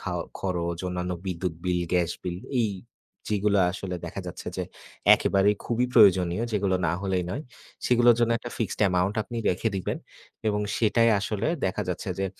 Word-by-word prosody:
খাওয়া - - -3 0.2
খরচ, 85 -3 -2
অন্যান্য 90 0 -2
বিদ্যুৎ 90 -1 -2
bill, 90 -1 +1
গ্যাস 90 -2 +2
bill। 90 -1 -4 0.2
এই, 110 - +1 0.6
যেগুলা 105 -1 +2
আসলে 95 -1 -5
দেখা - - -5
যাচ্ছে - - -8
যে - - -1 0.5
একেবারেই 100 +1 +2
খুবই 120 +1 +1
প্রয়োজনীয়, 95 -3 +5
যেগুলো 100 -2 +1
না 80 - +1
হলেই 95 -2 0
নয়। 140 - -3 0.4
সেগুলার 120 -1 +5
জন্য 115 0 +3
একটা 120 +1 -8
fixed 115 - -2
amount 90 +3 +1
আপনি 120 +2 -8
রেখে 95 +5 0
দিবেন 95 - -3 0.5
এবং 105 -1 0 0.2
সেটাই 115 +1 +3
আসলে 100 +3 -2 0.2
দেখা 95 - 0
যাচ্ছে - - -3
যে 95 - 0
95 Hz, 165 wpm, -26 LUFS, 90-110 Hz, 0.6 s, প্রয়োজনীয়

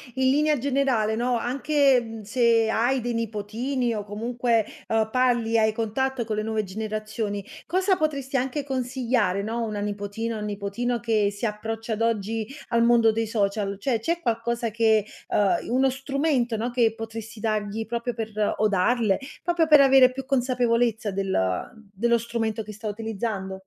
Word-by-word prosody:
in 260 0 +3
linea 300 +1 +3
generale, 255 -5 +1
no, 240 +1 +1
anche, 275 +1 +2
mhmm, 225 -1 -8
se 230 0 +3
hai 240 +4 +1
dei 240 0 -2
nipotini 230 +3 -2
o 210 -1 -3
comunque, 230 +2 0 0.2
ehm, 220 -1 +1
parli, 240 -3 +2
hai 220 0 +3
contatto 235 +3 -1
con 215 -1 -3
le - - +1
nuove 220 0 -1
generazioni, 215 0 -4 0.2
cosa 375 +3 +2
potresti 280 -4 -1
anche 265 +3 -1
consigliare, 250 -7 0
no, 225 +2 -3
a 230 -1 -1
una 210 -1 -4
nipotina, 205 +2 -3
un 210 - -4
nipotino 210 +4 -2
che 220 -3 +1
si 205 +3 -5
approccia 220 +1 -3
ad 215 - -4
oggi 225 -1 -1 0.2
al 235 -1 +3
mondo 235 -1 +5
dei 225 0 -1
social? 200 -2 -1
Cioè, 235 0 0
c'è 335 +8 -1
qualcosa 235 -1 -1
che, 220 -2 +3 0.2
uhm, 200 -2 +2
i - - -8
uno 260 +2 +3
strumento, 270 -3 0
no, 235 +3 -2
che 230 -3 +2
potresti 225 0 -7
dargli 215 0 -2
proprio 235 +1 -3
per 220 -1 -4 0.3
o 215 - +3
darle, 210 +1 +2 0.2
proprio 340 -1 +2
per 300 -1 +8
avere 270 -2 +6
più 265 0 -6
consapevolezza 240 -4 +1
del 195 0 -2
ehm, 95 - -2
dello 235 +4 +2
strumento 225 -1 -2
che 215 0 -9
sta 215 +1 -7
utilizzando? 205 -3 -4
230 Hz, 170 wpm, -25 LUFS, 215-250 Hz, 0.3 s, per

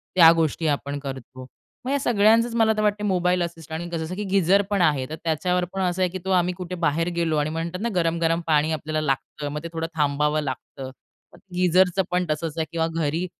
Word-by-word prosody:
त्या 165 -3 +9
गोष्टी 160 0 0
आपण 145 -1 -1
करतो. 130 -2 -8 0.4
मग 260 - -1
या 280 - +1
सगळ्यांचंच 230 -1 +3
मला 225 -1 +4
तर - - +1
वाटते 210 0 0
मोबाईल 180 -2 +1
असिस्टंट 165 -2 -6
आणि 175 +1 -6
कसं, 165 +1 -4
की 210 - -3
गिझर 195 0 +3
पण 200 -2 +1
आहे. 145 -6 +2
तर 155 - -4
त्याच्यावर 180 +3 0
पण 195 - -2
असं 180 0 0
आहे, 185 - +3
की 185 - -5
तो - - -3
आम्ही 180 -1 +2
कुठे 180 0 -5
बाहेर 160 +3 +1
गेलो 165 -2 0
आणि 150 0 0
म्हणतात 165 +3 -4
ना 235 - 0
गरम-गरम 165 -1 +1
पाणी 155 0 +2
आपल्याला 155 0 -2
लागतं. 145 +1 -3
मग 150 +1 -5
ते - - -4
थोडं 165 0 -2
थांबावं 150 0 +1
लागतं. 130 -1 -6 0.6
गिझरचं 180 +1 +3
पण 180 0 +1
तसंच 155 +1 -3
आहे 160 - 0
किंवा 165 -1 0
घरी 165 +2 -1
165 Hz, 210 wpm, -24 LUFS, 155-185 Hz, 0.6 s, त्या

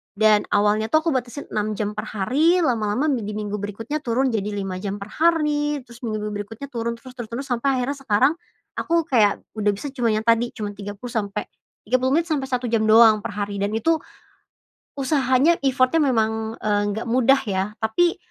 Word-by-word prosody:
Dan 215 0 +4
awalnya 210 +1 +2
tuh 315 +1 +3
aku - - +3
batasin 255 +3 -3
6 215 0 -1
jam 210 -1 -1
per 210 - -3
hari, 285 - +2
lama-lama 225 +1 0
mi 250 - 0
di 210 - -4
minggu 210 -1 -3
berikutnya 225 +9 -4
turun 255 0 0
jadi 210 -2 -1
5 195 -2 -4
jam 200 0 -3
per 200 - -8
hari, 300 -3 +1
terus 240 0 -15
minggu-minggu 215 -3 -3
berikutnya 225 +6 -9
turun, 235 -1 -2
terus 255 +2 -13
terus 240 -3 -7
terus 245 +4 -5
sampai 260 +2 0
akhirnya 280 +3 -2
sekarang 265 +3 +3 0.5
aku 335 0 +1
kayak 220 -8 +3 0.2
udah 210 -1 +1
bisa 245 +9 -6
cuman 230 -5 +1
yang - - -14
tadi, 230 +1 +3
cuman 205 -1 -4
30 205 +4 -7
sampe 210 -1 -2 0.4
30 255 +3 +2
menit 340 - -3
sampe 290 -3 0
1 250 -1 -1
jam 225 -1 +1
doang 220 -1 +7
per - - -4
hari. 200 -1 -3
Dan 200 - -1
itu 325 +9 +2 1.0
usahanya, 270 +2 +3
effort-nya 260 +4 +3
memang, 220 -4 0
eee, 205 -1 +1
nggak 220 +4 -4
mudah 255 +3 +4
ya. 190 -2 0 0.2
Tapi 285 +11 +2
230 Hz, 190 wpm, -22 LUFS, 210-270 Hz, 1.0 s, doang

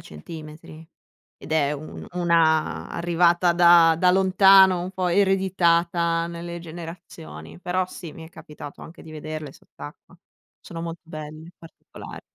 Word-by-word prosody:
centimetri 155 - -11 0.5
ed - - -9
è 150 -2 +1
u 150 0 -6 0.2
u - - -10
una 165 -2 +1
arrivata 175 +1 +2
da 170 -1 +6
da 180 0 +4
lontano, 190 0 +5
un 180 - -5
po' 185 -1 -2
ereditata 170 -3 +1
nelle 170 0 -7
generazioni. 160 - -11
Però 185 +1 -1
sì, 175 -3 -10
mi 160 - -11
è 160 - -12
capitato 150 -3 -12
anche 165 - -13
di 160 - -13
vederle 155 -1 -7
sott'acqua. 150 +5 -14 0.4
Sono 165 -1 -9
molto 165 0 -7
belle, 155 0 -9
particolar 165 - -12
170 Hz, 135 wpm, -23 LUFS, 155-175 Hz, 0.5 s, da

